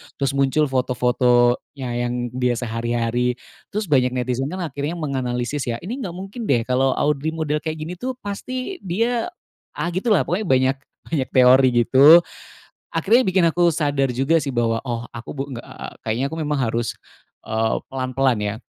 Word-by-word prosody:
Terus 140 -1 0
muncul 140 +2 +2
foto-fotonya 125 -1 +1 0.2
yang 120 -1 -3
dia 125 -1 0
sehari-hari. 120 +1 -1 0.3
Terus 210 +2 -3
banyak 125 -2 +3
netizen 125 +1 -1
kan 185 +4 -4
akhirnya 150 +1 -3
menganalisis 130 -3 -2
ya, 115 - -1
ini 240 +9 -5
nggak 180 -8 -5
mungkin 195 +5 -6
deh 120 -4 +2
kalau 130 +2 +1
Audrey 150 +2 0
model 150 -1 -1
kayak 155 0 -4
gini 175 +2 -7
tuh 255 0 -3
pasti 255 - -5
dia 230 - -1 0.5
ah, 175 - -2
gitu 185 +7 -3
lah, 210 -7 +4
pokoknya 195 +4 -2
banyak 130 -1 +3 0.3
banyak 140 -6 -2
teori 130 +1 +7 0.2
gitu. 150 +8 +7 0.7
Akhirnya 215 +10 +3
bikin 185 -1 +2
aku 170 -1 +2
sadar 145 -3 +1
juga 135 +6 +2
sih 140 -4 -4
bahwa, 115 -1 +1
"Oh, 120 -1 -2
aku 115 +3 -8
bu 135 - -3
nggak 120 -3 -7
eee, - - -8 0.2
kayaknya 115 +5 0
aku 160 - -5
memang 150 -2 -1
harus, 115 0 -1 0.5
eee, 110 0 0 0.2
pelan-pelan, 130 -2 0
ya. 105 0 -2
135 Hz, 165 wpm, -22 LUFS, 125-165 Hz, 0.7 s, teori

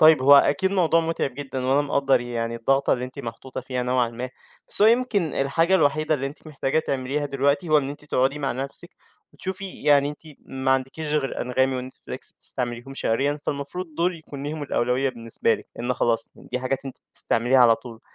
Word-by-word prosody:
طيب 155 -4 +7
هو 140 +1 +8
أكيد 190 +7 +4
موضوع 170 -4 +3
مُتعِب 165 -6 -2
جدًا 135 -2 -4
وأنا 135 +2 +4
مقدّر 140 -2 +2
يعني، 115 -1 -3
الضغطة 135 +4 +2
اللي 125 0 0
أنتِ 130 +3 -10
محطوطة 120 +1 -6
فيها 125 0 -3
نوعًا 125 -1 +1
ما. 125 +2 -6 0.4
بس - - 0
هو 215 - +8
يمكن 235 -4 +3
الحاجة 165 +7 +2
الوحيدة 155 -1 +3
اللي 135 -2 -2
أنتِ 145 +3 -10
محتاجة 145 -1 -1
تعمليها 140 0 -1
دلوقتي 140 +5 +1
هو 155 -1 +6
إن 135 - -2
أنتِ 145 +1 -10
تقعدي 135 0 +1
مع 140 -2 -1
نفسِك 135 +2 -6 0.4
وتشوفي 190 0 -6
يعني 145 -1 +5
أنتِ 150 - -7 0.3
ما 130 0 -2
عندكيش 135 +4 -1
غير 140 -3 0
Anghami 130 +1 0
وNetFlix - - -10
بتستعمليهم 120 +1 -5
شهريًا 140 +4 0
فالمفروض 150 +4 -4
دُول 170 +2 +1
يكون 140 -3 -9
ليهم 150 +1 -4
الأولوية 130 0 +1
بالنسبة 115 -2 0
لِك، - - -10
لإن 120 +2 -1
خلاص 115 -1 0
دي 125 - -5
حاجات 130 +2 -2
أنتِ 135 - -7
بتستعمليها 120 +3 +2
على 120 -2 +7
طول. 115 -2 -11
135 Hz, 190 wpm, -24 LUFS, 125-150 Hz, 0.4 s, هو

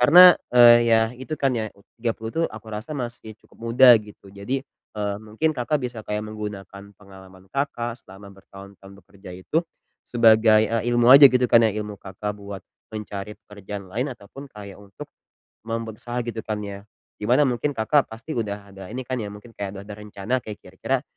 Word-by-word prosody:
Karena, 175 +8 +9 0.2
eee, 120 -1 +9
ya 115 -1 +5
itu 130 +5 -7
kan 135 -2 +1
ya 110 -3 -2
u 100 - -22 0.2
30 115 -1 -3
tuh 165 - 0
aku 110 0 -11
rasa 105 +8 -6
masih 120 -4 -6
cukup - - -23
muda 125 +1 +8
gitu. 105 -2 -15
Jadi, 100 +8 -4 0.3
eee, 105 -1 -2
mungkin 110 +9 -1
Kakak 140 +4 -1
bisa 120 -2 -4
kayak 105 0 -2
menggunakan 100 -2 -8
pengalaman 95 -1 -16
Kakak 120 -3 -3
selama 100 -1 -14
bertahun-tahun 95 0 -14
bekerja 95 -2 -14
itu, 95 - -1 0.5
sebagai, 110 -2 +5
eee, 115 -1 0
ilmu 120 0 +4
aja 140 +2 +11
gitu 125 -1 +2
kan 115 - +7
ya. - - +1
Ilmu 105 -1 -5
Kakak 100 +2 -6
buat 100 -1 -8 0.3
mencari 105 -1 -6
pekerjaan 100 -1 -9
lain 125 +8 -2
ataupun 125 +6 -12
kayak 100 -4 -11
untuk 100 -2 -12 0.6
membuat 115 -1 -5
usaha 120 0 -5
gitu 115 -1 -5
kan 110 -1 -2
ya. 100 0 -8 0.3
Di 105 - -5
mana 125 +6 +4
mungkin 125 +4 -1
Kakak 135 +6 +2
pasti 115 +8 -8
udah 100 -2 -5
ada 95 -1 -10
ini 130 - -4
kan 130 -1 -3
ya, 105 - -4
mungkin 105 +3 -13
kayak 100 -1 -5
udah 100 - -9
ada 105 - -8
rencana 105 +4 -3
kayak 105 -2 -8
kira-kira 120 +8 -3
110 Hz, 185 wpm, -23 LUFS, 100-120 Hz, 0.6 s, aja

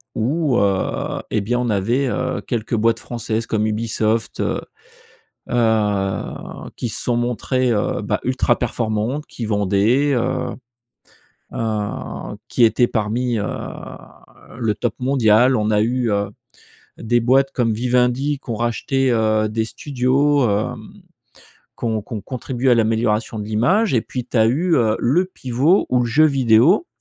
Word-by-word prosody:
où, 135 +3 +1
heu, 100 -2 -1
eh 110 - +1
bien, 120 +5 -1
on 125 -1 -1
avait, 115 +7 +1
heu, - - -2
quelques 115 -1 -2
boîtes 115 +1 +2
françaises 115 -1 -3
comme 110 -1 0
Ubisoft, 110 0 -1
heu - - -1 0.9
heu, 105 -5 -1
qui 120 - -3
se - - -5
sont 120 -1 0
montrées, 125 +1 0
heu, 105 -3 0
bah - - -1
ultra 130 -1 +1
performantes, 120 +4 -2
qui 115 - -6
vendaient, 105 +7 +2
heu 120 - -1 1.1
heu, 105 -3 -4
qui 120 - +1
étaient 120 +2 +4
parmi, 115 +2 -1
heu, 105 - -2 1.1
le 115 -4 0
top 120 - -2
mondial. 125 -1 +4
On 105 -2 0
a 105 -1 +3
eu, 120 +1 0
heu, 100 0 0 0.7
des 120 +2 +1
boîtes 135 +3 +3
comme 115 -3 +1
Vivendi 125 +4 +1
qui - - -9
ont - - -1
racheté, 125 +3 0
heu, 110 -1 +2
des 110 +1 -1
studios, 135 +2 +1
hem, 105 +1 -2 0.9
qui - - -6
ont 110 -2 0
qui 115 - -8
ont 105 - -3
contribué 130 0 -2
à - - +6
l'amélioration 110 -1 0
de 105 - -4
l'image 145 - +2
et 120 - +3
puis 125 +2 -5
tu - - -5
as 110 -1 +5
eu, 165 +9 +2
heu, 110 -3 +2
le 150 +10 +2
pivot 145 +2 +1
où 125 - +3
le 120 - +1
jeu 140 +7 +4
vidéo, 135 - +4
120 Hz, 155 wpm, -20 LUFS, 110-130 Hz, 1.1 s, à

